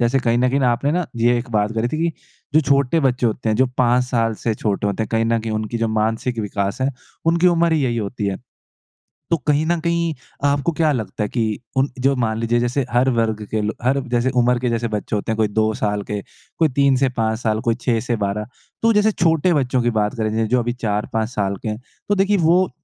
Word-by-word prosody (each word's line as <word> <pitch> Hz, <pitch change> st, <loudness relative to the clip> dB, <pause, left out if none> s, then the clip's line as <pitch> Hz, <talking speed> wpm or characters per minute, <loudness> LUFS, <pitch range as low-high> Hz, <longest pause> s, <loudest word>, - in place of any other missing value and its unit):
जैसे 120 Hz, +3 st, +2 dB
कहीं 120 Hz, -1 st, +1 dB
न 125 Hz, +1 st, +3 dB
कहीं 135 Hz, +2 st, +1 dB
ना 125 Hz, -2 st, +3 dB
आपने 140 Hz, +5 st, 0 dB
ना 180 Hz, +1 st, 0 dB
ये 120 Hz, +1 st, +3 dB
एक 120 Hz, +1 st, -7 dB
बात 105 Hz, 0 st, +1 dB
करी 115 Hz, +2 st, 0 dB
थी 155 Hz, -, -3 dB
कि 170 Hz, -1 st, +1 dB, 0.4 s
जो 155 Hz, -, +7 dB
छोटे 140 Hz, +2 st, +2 dB
बच्चे 130 Hz, -3 st, +1 dB
होते 115 Hz, +1 st, -2 dB
हैं 110 Hz, -, +2 dB
जो 130 Hz, -, +4 dB
5 125 Hz, 0 st, +3 dB
साल 115 Hz, -3 st, 0 dB
से 115 Hz, -, +1 dB
छोटे 105 Hz, -1 st, -1 dB
होते 100 Hz, +2 st, -1 dB
हैं -, -, -4 dB
कहीं 115 Hz, 0 st, +2 dB
न 115 Hz, 0 st, +1 dB
कहीं 110 Hz, -1 st, -4 dB
उनकी 110 Hz, +2 st, -2 dB
जो 115 Hz, -, 0 dB
मानसिक 110 Hz, +2 st, -1 dB
विकास 100 Hz, +2 st, -2 dB
है, 135 Hz, +2 st, +1 dB, 0.4 s
उनकी 170 Hz, +2 st, +3 dB
उम्र 170 Hz, -1 st, +3 dB
ही 155 Hz, -2 st, +2 dB
यही 120 Hz, -2 st, 0 dB
होती 105 Hz, 0 st, -3 dB
है। 100 Hz, -1 st, -1 dB, 0.9 s
तो 170 Hz, -, +3 dB
कहीं 150 Hz, +1 st, +3 dB
न 170 Hz, +1 st, +1 dB
कहीं 170 Hz, 0 st, 0 dB, 0.3 s
आपको 140 Hz, +3 st, +2 dB
क्या 155 Hz, -2 st, +4 dB
लगता 110 Hz, -5 st, -3 dB
है 105 Hz, -, -2 dB
कि 110 Hz, -4 st, -1 dB, 0.2 s
उन 135 Hz, +2 st, +3 dB
जो 135 Hz, +2 st, +2 dB
मान 110 Hz, -1 st, 0 dB
लीजिए 115 Hz, +1 st, +1 dB
जैसे 125 Hz, +3 st, 0 dB
हर 125 Hz, +2 st, +3 dB
वर्ग 115 Hz, -3 st, 0 dB
के 110 Hz, -, 0 dB
लो 105 Hz, +1 st, -1 dB
हर 135 Hz, +3 st, +2 dB
जैसे 120 Hz, +1 st, +1 dB
उम्र 120 Hz, 0 st, +2 dB
के 125 Hz, -, -1 dB
जैसे 115 Hz, 0 st, -1 dB
बच्चे 105 Hz, 0 st, -3 dB
होते 105 Hz, +2 st, -2 dB
हैं 110 Hz, -, -2 dB
कोई 110 Hz, -, +2 dB
2 110 Hz, +1 st, +1 dB
साल 105 Hz, -1 st, -1 dB
के, 105 Hz, 0 st, -4 dB, 0.4 s
कोई 160 Hz, -, +4 dB
3 140 Hz, -1 st, +4 dB
से 130 Hz, 0 st, +2 dB
5 110 Hz, -1 st, 0 dB
साल, 110 Hz, -2 st, 0 dB
कोई 115 Hz, 0 st, 0 dB
6 115 Hz, -1 st, 0 dB
से 120 Hz, 0 st, -1 dB
12 105 Hz, 0 st, -2 dB, 0.3 s
तो 230 Hz, -, +4 dB
जैसे 210 Hz, +1 st, +3 dB
छोटे 170 Hz, -2 st, +2 dB
बच्चों 130 Hz, -4 st, +1 dB
की 120 Hz, -, +2 dB
बात 105 Hz, +2 st, 0 dB
करें 110 Hz, -1 st, 0 dB
जैस 110 Hz, 0 st, +1 dB
जो 125 Hz, 0 st, +3 dB
अभी 120 Hz, 0 st, -1 dB
4-5 110 Hz, -1 st, -2 dB
साल 100 Hz, -4 st, -1 dB
के 110 Hz, -, -2 dB
है, 105 Hz, -, -3 dB, 0.3 s
तो 205 Hz, -, +3 dB
देखिए 195 Hz, +1 st, +2 dB
वो 175 Hz, +2 st, +3 dB
120 Hz, 250 wpm, -20 LUFS, 110-140 Hz, 0.9 s, जो